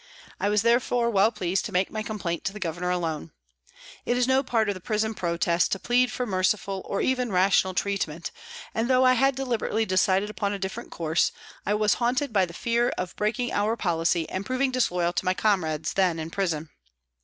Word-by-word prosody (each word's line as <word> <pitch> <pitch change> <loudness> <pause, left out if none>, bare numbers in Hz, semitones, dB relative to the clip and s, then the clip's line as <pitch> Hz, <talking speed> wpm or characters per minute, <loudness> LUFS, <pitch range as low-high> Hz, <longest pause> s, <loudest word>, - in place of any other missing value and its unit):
I 200 - +1
was 210 0 +2
therefore 235 0 +2
well 200 +1 +4
pleased 190 -4 -1
to - - -5
make 185 +1 +1
my 215 - -3
complaint 200 -6 -3
to 195 - -1
the 210 - -8
Governor 175 0 -3
alone. 165 -3 -2 0.7
It 245 - 0
is 250 0 +2
no 260 +1 +4
part 230 -5 0
of 205 - +1
the 185 - -10
prison 215 +3 -1
protest 170 -2 0
to 195 - -2
plead 245 +3 +2
for 250 - -2
merciful 195 -1 0
or 200 - -2
even 250 -3 0
rational 190 0 +3
treat 200 -1 0
ment, 160 +2 -7 0.4
and 225 +3 -1
though 255 0 +4
I 255 - +6
had 270 +2 +3
deliberately 235 -4 -1
decided 190 +1 +2
upon 200 0 -2
a - - -2
different 190 0 -5
course, 165 0 0 0.4
I 205 - +2
was 210 0 +3
haunted 250 +2 0
by 190 -3 +3
the - - -10
fear 235 +6 0
of 180 -1 -4
breaking 225 +4 -1
our 215 +3 +1
policy 165 -3 0
and 190 - -4
proving 255 +4 0
disloyal 180 -9 +1
to 180 - -1
my 185 0 +2
comrades 160 -8 0
then 185 -4 +2
in 160 0 -5
prison. 165 -5 -2
200 Hz, 205 wpm, -26 LUFS, 180-235 Hz, 0.7 s, I